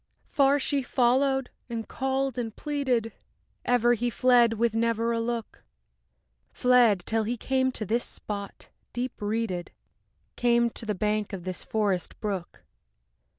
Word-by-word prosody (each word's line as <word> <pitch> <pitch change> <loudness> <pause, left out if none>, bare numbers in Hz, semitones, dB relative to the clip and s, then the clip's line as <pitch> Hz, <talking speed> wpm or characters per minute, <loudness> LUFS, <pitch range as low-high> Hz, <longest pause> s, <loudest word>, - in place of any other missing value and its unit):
IV - - -32
Far 280 0 +4
she 280 0 0
followed 260 +1 +2 0.2
and 230 -1 -4
called 265 -1 -1
and 225 -2 -4
pleaded, 260 -7 -1 0.5
Ever 240 -1 +4
he 240 +1 0
fled 240 -1 +4
with 230 0 +1
never 230 0 +1
a 230 - 0
look; 230 0 -4 0.9
Fled, 245 -7 +4
till 225 0 +1
he 235 +3 -2
came 260 +2 +1
to 215 - -3
this 230 +5 0
spot, 200 -1 -7 0.2
deep 245 0 -4
reeded, 205 -4 -2 0.7
Came 235 -1 +3
to 225 - -5
the 210 - 0
bank 210 +1 -1
of 185 -3 -5
this 185 0 -5
forest 200 -5 -1
brook. 195 -5 -4
235 Hz, 145 wpm, -27 LUFS, 215-250 Hz, 0.9 s, Far